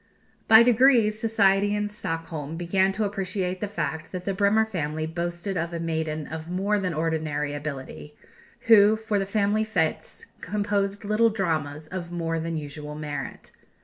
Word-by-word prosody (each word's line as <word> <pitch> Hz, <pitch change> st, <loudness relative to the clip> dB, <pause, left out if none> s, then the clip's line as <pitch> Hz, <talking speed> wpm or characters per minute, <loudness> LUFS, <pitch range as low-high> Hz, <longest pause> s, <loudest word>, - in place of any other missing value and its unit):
By 220 Hz, +1 st, +9 dB
degrees, 235 Hz, -3 st, +4 dB
society 205 Hz, -2 st, +3 dB
in 210 Hz, 0 st, -1 dB
Stockholm 165 Hz, -6 st, -5 dB
began 190 Hz, +3 st, +2 dB
to 215 Hz, +3 st, -1 dB
appreciate 190 Hz, -2 st, -2 dB
the 210 Hz, -, -1 dB
fact 160 Hz, -5 st, -4 dB
that 185 Hz, -1 st, -5 dB
the 195 Hz, -, -1 dB
Bremer 205 Hz, +3 st, +3 dB
family 155 Hz, -6 st, -3 dB
boasted 175 Hz, +3 st, -3 dB
of 170 Hz, +1 st, -2 dB
a 170 Hz, -, -3 dB
maiden 160 Hz, -2 st, -2 dB
of 160 Hz, +2 st, -7 dB
more 200 Hz, +4 st, 0 dB
than 185 Hz, -3 st, -1 dB
ordinary 155 Hz, -2 st, -1 dB
ability, 135 Hz, -, -7 dB, 0.5 s
who, 215 Hz, -1 st, +6 dB
for 220 Hz, -2 st, -1 dB
the 195 Hz, -, -2 dB
family 210 Hz, +1 st, +1 dB
fêtes, 180 Hz, -8 st, -2 dB, 0.2 s
composed 205 Hz, +1 st, -1 dB
little 215 Hz, +2 st, +3 dB
dramas 155 Hz, -7 st, -2 dB
of 175 Hz, -2 st, -6 dB
more 165 Hz, -1 st, -2 dB
than 165 Hz, 0 st, -3 dB
usual 150 Hz, 0 st, -7 dB
merit. 150 Hz, -1 st, -6 dB
180 Hz, 155 wpm, -25 LUFS, 160-205 Hz, 0.5 s, By